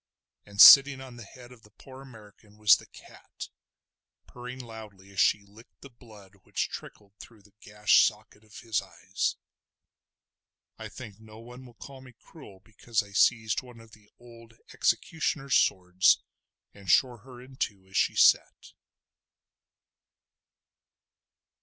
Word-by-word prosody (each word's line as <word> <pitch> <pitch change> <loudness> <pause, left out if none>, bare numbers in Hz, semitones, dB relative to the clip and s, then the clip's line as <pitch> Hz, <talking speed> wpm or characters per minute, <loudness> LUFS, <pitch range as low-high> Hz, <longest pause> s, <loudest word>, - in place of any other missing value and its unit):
And 100 0 -14
sitting 135 +1 +9
on 130 -2 -12
the 120 - -11
head 125 +4 -16
of 125 -3 -17
the 105 - -21
poor 130 +5 -16
American 105 -4 -18
was 105 -1 +5
the - - -16
cat, - - -14 0.8
purring 125 +1 -11
loudly 110 -5 -13
as 100 - -8
she 105 - +2
licked 105 +4 -21
the 140 - -14
blood 105 -5 -19
which - - -4
trickled 100 -1 -12
through 110 -4 -16
the 100 0 -25
gashed 105 0 +2
socket 105 0 -10
of 105 -1 -15
his 115 -3 -2
eyes. 90 0 -5 1.4
I - - -9
think 110 -5 -12
no 110 -1 -16
one 125 +3 -14
will 120 - -19
call 135 +3 -13
me 130 -1 -16
cruel 105 - -17
because 110 +2 -4
I 100 - -17
seized 110 +1 +1
one 125 -2 -16
of 115 -1 -18
the 105 -1 -21
old 115 -1 -18 0.2
executioner's 150 -4 -2
swords 90 0 +2 0.5
and 100 -2 -13
shore 125 +4 +2
her 125 +2 -15
in 130 +1 -16
two 100 -6 -5
as 95 - -17
she - - 0
sat. - - +1
110 Hz, 145 wpm, -26 LUFS, 100-125 Hz, 1.4 s, sitting